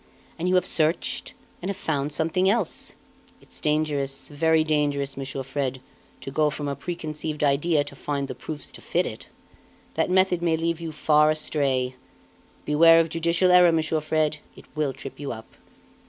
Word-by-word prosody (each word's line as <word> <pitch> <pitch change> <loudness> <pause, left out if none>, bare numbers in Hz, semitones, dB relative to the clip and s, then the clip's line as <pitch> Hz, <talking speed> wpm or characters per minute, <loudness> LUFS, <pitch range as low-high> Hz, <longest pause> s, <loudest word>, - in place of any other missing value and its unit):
And 175 +2 0
you 185 - +3
have 180 -1 +3
searched, 160 -1 0 0.3
and 185 - -4
have 200 - -3
found 145 -2 -1
something 165 +5 +1
else. 210 -4 0 0.4
It's - - -8
dangerous, 145 -3 -1
very 160 +2 +2
dangerous, 145 -3 0
Monsieur 135 0 -5
Fred, 135 -1 -3 0.4
to 135 - -6
go 150 +2 +2
from 145 0 -4
a 140 - -2
preconceived 155 0 -4
idea 145 +2 +2
to 145 - -10
find 140 -2 -3
the - - -5
proofs 150 -2 -6
to - - -11
fit - - 0
it. - - -7 0.6
That - - 0
method 185 -1 +3
may 165 -2 +2
lead 165 0 -1
you 165 -1 -5
far 150 0 +3
astray. 135 -4 0 0.7
Beware 165 +2 +6
of 165 0 +2
judicial 170 +3 +2
error, 180 -1 +7
Monsieur 160 -1 0
Fred, 155 0 0 0.2
it - - -14
will 150 -3 0
trip 135 0 -9
you 145 -2 -4
up!" 110 -1 -9
155 Hz, 170 wpm, -25 LUFS, 140-165 Hz, 0.7 s, error